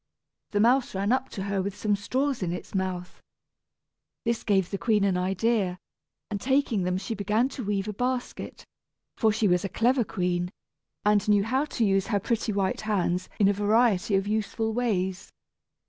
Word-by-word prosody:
The 205 - 0
mouse 245 +1 +3
ran 200 +3 0
up 260 +1 +1
to 195 - -5
her 200 -1 -1
with 200 +1 -4
some 210 -1 +1
straws 260 +6 -1
in 175 -2 -1
its 180 - -6
mouth. 185 -2 -3 1.0
This 235 -1 0
gave 195 -4 +1
the 195 - -2
queen 215 -3 +2
an 195 -2 +2
idea, 190 +1 0 0.5
and 200 -1 -3
taking 265 -5 +1
them 180 0 0
she 200 +4 -4
began 215 +4 +1
to 265 -2 -6
weave 200 -1 -1
a 210 - -3
basket, 250 +3 -3 0.5
for 220 -2 +3
she 210 0 +1
was 180 -1 +2
a 195 - -2
clever 240 +6 +2
queen, 180 -4 -1 0.6
and 210 0 +3
knew 205 -1 +5
how 260 +7 +1
to 240 -6 -1
use 195 -1 +2
her 205 -4 +1
pretty 225 +2 -1
white 195 -2 0
hands 185 -4 0
in 200 - +5
a 200 - +4
variety 205 -1 +2
of 195 0 +1
useful 220 +1 -1
ways. 190 -6 -1
205 Hz, 180 wpm, -27 LUFS, 190-230 Hz, 1.0 s, knew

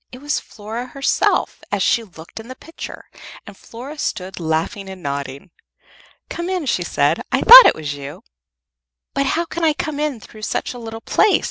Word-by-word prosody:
It 250 - -10
was 290 +2 -1
Flora 225 +4 -8
herself, 275 +1 0
as - - 0
she 235 - +2
looked 170 -2 -12
in 225 - -10
the 255 - -8
picture, 325 +5 -10 0.4
and 205 - -11
Flora 260 +9 -10
stood 185 -6 -4
laughing 165 +5 -2
and 190 -2 -10
nodding. 140 +3 -5 0.8
"Come 345 +1 -5
in," 365 -4 -2
she - - 0
said. - - +1
"I - - +1
thought - - +11
it - - +3
was 150 -2 -4
you." 140 0 -9 0.9
"But 275 0 0
how 335 +5 0
can 335 0 -5
I 315 -2 +4
come 295 -1 -4
in 300 -5 -2
through 215 +1 -14
such 215 - -3
a 245 - -9
little 225 -1 -8
place?" 420 - +3
230 Hz, 190 wpm, -20 LUFS, 185-295 Hz, 0.9 s, thought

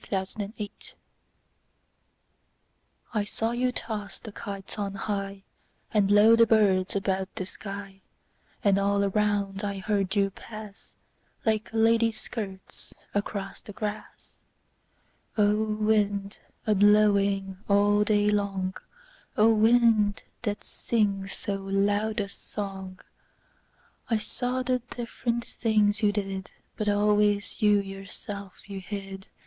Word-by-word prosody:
The 190 -1 0
Wind 210 0 -7 2.2
I 210 -2 +1
SAW 225 +2 -2
you 250 +1 +1
toss 215 -4 -5
the 220 - -10
kites 200 0 -6
on 200 -1 -2
highAnd 200 +1 -3
blow 210 +3 +7
the 230 0 +5
birds 200 -5 +3
about 190 -1 -1
the 185 - -3
sky; 195 0 -8 0.6
And 200 -1 +4
all 200 0 +2
around 200 0 0
I 200 -1 -2
heard 195 0 0
you 200 -1 +2
pass, 215 0 -11 0.5
Like 220 -1 +1
ladies' 225 0 +3
skirts 195 -5 -7 0.2
across 200 -1 -3
the 205 - -10
grass—O 210 0 -4
wind, 205 -2 +1 0.3
a 215 - +3
blowing 200 -2 +4
all 205 +1 +4
day 210 0 +3
long,O 210 - -1
wind, 220 -2 +4 0.2
that 210 -3 -3
sings 200 -4 0
so 200 -1 -2
loud 205 +2 0
a 200 - -1
song!I 195 +3 -8
saw 250 +4 -2
the 255 0 +1
different 235 0 -3
things 215 -2 +1
you 210 -1 +4
did, 195 -2 -3 0.3
But 210 -1 -1
always 205 +1 +2
you 210 -1 +5
yourself 195 0 -8
you 200 -1 -5
hid. 195 -1 -7
205 Hz, 110 wpm, -27 LUFS, 195-215 Hz, 2.2 s, blow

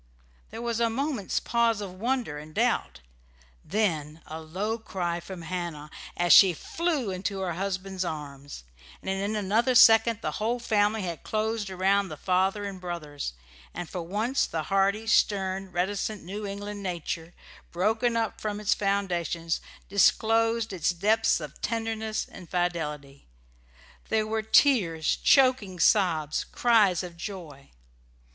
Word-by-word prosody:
There 225 +2 -7
was 235 -1 -1
a 230 -1 +2
moment's 260 -3 -1
pause 235 -2 +1
of 200 -3 -6
wonder 230 - -2
and 155 +1 -12
doubt, - - 0 0.6
then 160 -6 -1
a 160 +1 -7
low 200 +8 -3
cry 175 -5 -3
from 175 0 -9
Hannah, 165 -3 -5 0.3
as 175 0 +5
she 190 -3 +8
flew 300 - -2
into 190 +1 -3
her 180 -2 -2
husband's 190 +1 -3
arms; 145 - -7 0.4
and 190 - -2
in 200 +2 -2
another 215 +5 +1
second 225 0 +6
the - - -1
whole 230 +3 +1
family 215 -2 +1
had 170 -3 -4
closed 215 -1 -2
around 190 +1 +1
the 155 - -7
father 190 +4 +1
and 195 -2 -6
brothers, 155 - -5 0.4
and 175 0 -5
for 180 - -5
once 215 +10 0
the 160 -1 -3
hardy, 200 +3 +2
stern, 195 -3 +1
reticent 195 +3 -2
New 200 +4 -5
England 205 +1 -6
nature, 170 -2 -4 0.4
broken 225 +6 +1
up 225 -2 -2
from 210 -1 -3
its 210 -1 +2
foundations, 175 -5 -1 0.3
disclosed 225 +2 +2
its 175 -4 0
depths 210 +6 +2
of 150 -3 -9
tenderness 225 -1 -2
and 175 - -12
fidelity. 150 -6 -3 0.8
There 220 -1 +1
were 220 0 -1
tears, 215 - +3
choking 255 -9 +3
sobs, 165 -5 +2
cries 210 -7 +3
of 175 -2 -9
joy. 165 -7 -8
195 Hz, 140 wpm, -27 LUFS, 175-220 Hz, 0.8 s, she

